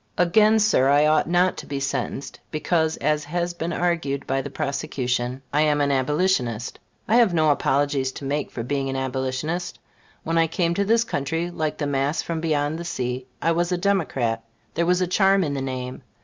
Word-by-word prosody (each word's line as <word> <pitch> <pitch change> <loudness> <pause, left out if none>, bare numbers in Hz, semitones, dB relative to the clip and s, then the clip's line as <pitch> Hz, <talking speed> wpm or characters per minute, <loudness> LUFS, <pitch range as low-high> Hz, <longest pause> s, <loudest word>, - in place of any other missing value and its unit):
Again, 210 +5 +4
Sir, 210 -11 +3
I 145 +1 +5
ought 155 +1 +3
not 180 +1 +2
to - - -8
be 140 -1 -3
sentenced 135 0 -3
because, 160 +1 0
as 150 +1 0
has 175 +3 -2
been 170 0 -4
argued 165 -5 -1
by 135 0 0
the 145 - -6
prosecution, 130 -3 -2
I 150 - +3
am 150 -1 +2
an 140 -1 +2
Abolitionist. 130 - 0 0.3
I 225 - +4
have 225 -8 +4
no 155 -2 +4
apologies 140 -1 +1
to 140 - -8
make 145 +1 -1
for 115 - -5
being 135 +2 -2
an 135 - -3
Abolitionist. 130 +7 -2 0.5
When 165 +1 +1
I 165 - +4
came 170 +1 0
to 200 +3 0
this 230 +2 +3
country, 165 -2 -2
like 155 -3 -2
the 145 - -2
mass 140 +2 0
from 165 -1 -3
beyond 155 -1 0
the - - -4
sea, 125 -5 -3 0.2
I 165 - +3
was 175 +2 0
a 180 - +1
Democrat; 145 - 0 0.3
there 170 +1 0
was 180 +1 +3
a 180 - +1
charm 195 +1 +3
in 145 -4 -2
the 140 - -2
name. 130 -1 -5
150 Hz, 200 wpm, -23 LUFS, 135-175 Hz, 0.5 s, I